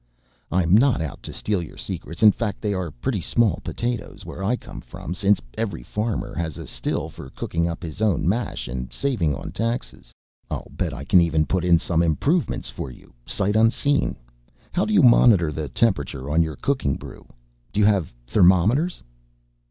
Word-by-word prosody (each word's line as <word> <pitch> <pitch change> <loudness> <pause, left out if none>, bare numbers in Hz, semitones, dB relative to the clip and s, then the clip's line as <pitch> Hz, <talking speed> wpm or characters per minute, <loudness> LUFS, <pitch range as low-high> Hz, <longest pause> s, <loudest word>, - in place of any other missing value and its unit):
"I'm 85 -1 +2
not 125 +3 +4
out 80 -3 -5
to - - -6
steal 105 -4 -1
your 85 - -9
secrets, 85 +6 -5
in 105 - +9
fact 105 -2 -3
they 105 -1 -1
are 95 -3 -2
pretty - - -3
small 115 -7 +2
potatoes 120 -2 -4
where 95 - -7
I 110 +6 +2
come - - -9
from 85 - -7
since 100 +2 +2 0.2
every 105 - -3
farmer 105 - -3
has 85 -3 -3
a - - -7
still - - -2
for 65 - -10
cooking 85 +5 -2
up 85 +1 -5
his 85 +5 -6
own 100 -7 +2
mash 115 +6 -1
and 65 +1 -5
saving 100 - 0
on - - -7
taxes. 65 - -3 0.4
I'll - - -5
bet 90 -4 -2
I 70 0 -6
can 90 +4 +5
even 80 -2 +2
put 95 +1 0
in 85 -1 +5
some 85 0 0
improvements 140 - +1
for - - -5
you, 60 - -15
sight 100 +1 0
unseen. 115 +6 +2 0.6
How 180 - +1
do - - -2
you 190 - +6
monitor 110 -9 +6
the 75 -1 -4
temperature 70 - 0
on 80 +2 +4
your 80 -2 -1
cooking 75 - 0
brew? - - -10 0.4
Do - - -2
you 105 - +5
have 100 -7 +2
thermometers?" 105 - +3
95 Hz, 185 wpm, -23 LUFS, 80-115 Hz, 0.6 s, in